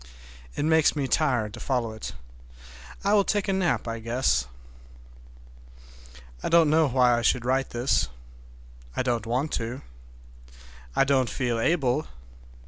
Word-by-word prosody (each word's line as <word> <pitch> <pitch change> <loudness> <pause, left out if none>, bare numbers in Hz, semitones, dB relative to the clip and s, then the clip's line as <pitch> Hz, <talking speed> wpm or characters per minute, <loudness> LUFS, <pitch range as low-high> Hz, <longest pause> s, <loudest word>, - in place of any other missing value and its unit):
It - - -1
makes 160 -1 +3
me 140 -3 -1
tired 120 -9 +1
to 120 - -8
follow 125 -4 -1
it. 110 0 -7 0.9
I 200 +1 +2
will 205 -1 +5
take 205 0 -1
a 195 - +1
nap, 175 - 0
I 115 0 -4
guess. 115 - 0 1.9
I - - -2
don't 165 -3 +5
know 160 0 +4
why 125 -2 +3
I 120 - -1
should 120 +1 +1
write 130 +1 0
this. 120 +2 +1 0.9
I - - 0
don't 120 -3 -1
want 130 +6 -1
to. 115 +3 -5 1.1
I - - +4
don't 135 -3 +2
feel 120 -2 -1
able. 145 0 +1
130 Hz, 140 wpm, -26 LUFS, 120-155 Hz, 1.9 s, will